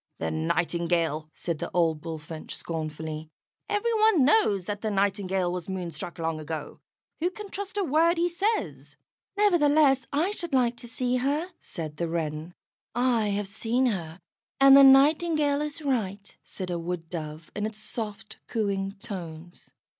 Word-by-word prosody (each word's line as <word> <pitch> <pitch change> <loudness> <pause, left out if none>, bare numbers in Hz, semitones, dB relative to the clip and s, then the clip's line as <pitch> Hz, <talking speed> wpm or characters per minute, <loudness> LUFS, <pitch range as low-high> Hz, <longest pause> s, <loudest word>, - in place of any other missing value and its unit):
"The 80 - -2
Nightingale!" 165 - 0
said 170 -3 -3
the - - -3
old 165 -3 +2
Bullfinch, 160 -1 -7
scornfully. 155 -1 -5 0.4
"Every 415 +3 +1
one 430 - +4
knows 210 - +3
that 205 +1 -4
the 220 - -1
Nightingale 195 -2 0
was 180 0 -5
moonstruck 175 -2 -5
long 165 -1 -2
ago. 155 -1 -6 0.4
Who 345 +3 +1
can 405 +2 -9
trust 395 +1 -6
a 405 - +2
word 330 +2 +3
he 345 +1 +3
says?" 400 +6 -2 0.4
"Nevertheless, 300 -9 +4
I 320 +8 +1
should 345 -7 -3
like 245 -2 +3
to 240 - -7
see 250 +1 -1
her," 290 +7 0
said 155 -4 -7
the 170 - -1
Wren. 160 0 -3 0.4
"I 240 -3 +2
have 205 0 -1
seen 230 +5 0
her, 175 -7 -2 0.4
and 275 0 +9
the 275 - +9
Nightingale 290 +2 +5
is 300 +1 -4
right," 205 -7 -2
said 185 -2 -6
a 170 - -1
Wood 165 -1 -4
dove 155 -2 -6
in 210 +1 -1
its 220 -1 -8
soft, 215 -1 -5
cooing 195 -3 -1
tones. 175 -5 -9
205 Hz, 155 wpm, -27 LUFS, -, 0.4 s, and